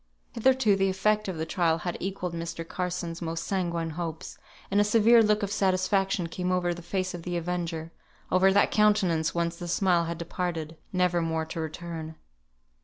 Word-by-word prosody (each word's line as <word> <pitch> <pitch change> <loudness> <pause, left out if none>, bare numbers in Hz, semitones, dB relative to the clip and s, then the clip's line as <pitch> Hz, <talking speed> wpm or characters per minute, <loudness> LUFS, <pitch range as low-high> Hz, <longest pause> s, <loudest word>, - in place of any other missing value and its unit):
Hitherto 245 -3 +3
the 195 0 +2
effect 210 +3 +1
of 185 -3 -3
the 160 - -2
trial 165 -1 +1
had 175 +1 -4
equalled 185 -2 -3
Mr. 165 0 -5
Carson's 180 -2 -3
most 165 0 -3
sanguine 170 -4 -1
hopes, 165 -1 -6 0.3
and 200 +1 +4
a - - +5
severe 230 +2 +5
look 210 -1 +2
of 200 - -2
satisfaction 190 -1 +1
came 180 +2 -3
over 180 -1 +1
the 175 - -9
face 185 +1 -2
of 175 - -6
the 175 +1 -3
avenger, 165 -1 -3 0.4
over 190 +1 +5
that 200 +1 +3
countenance 190 -7 +2
whence 170 0 -1
the 175 - -6
smile 175 -1 +2
had 170 0 -4
departed, 170 -2 -4 0.2
never 180 -2 +2
more 160 -1 -1
to 165 - -6
return. 160 0 -5
175 Hz, 180 wpm, -27 LUFS, 165-195 Hz, 0.4 s, a